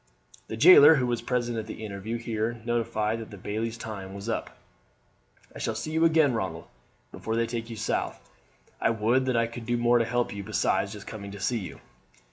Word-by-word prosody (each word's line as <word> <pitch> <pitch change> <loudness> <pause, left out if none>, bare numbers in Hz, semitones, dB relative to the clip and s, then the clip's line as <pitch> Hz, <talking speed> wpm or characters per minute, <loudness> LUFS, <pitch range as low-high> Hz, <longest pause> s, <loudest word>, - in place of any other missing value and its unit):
The 110 - -5
jailer, 160 +1 +9
who 130 -3 +1
was 120 -1 -1
present 120 -2 -1
at 110 - -6
the 110 0 -7
interview, 105 +3 -4
here 115 0 -3
notified 115 -2 -1
that 110 - -8
the 105 - -10
bailie's 110 +4 -3
time 100 -4 -7
was 100 +2 -7
up. 115 - -3 1.0
"I - - -8
shall 110 - -2
see 155 +8 -4
you 160 +1 +3
again, 160 -5 +4
Ronald, 95 -7 -3 0.5
before 110 - -4
they 115 0 +2
take 115 0 -5
you 115 - -6
south. 110 - -2 0.6
I - - +3
would 115 +4 +1
that 125 -2 +1
I 115 - +3
could 115 0 -8
do 120 0 +1
more 120 0 +3
to 115 - +2
help 120 0 -1
you 100 -1 -6
besides 105 -2 0
just - - -10
coming 100 -2 -7
to 100 0 -9
see 120 +4 0
you." 95 - -8
115 Hz, 210 wpm, -27 LUFS, 110-120 Hz, 1.0 s, jailer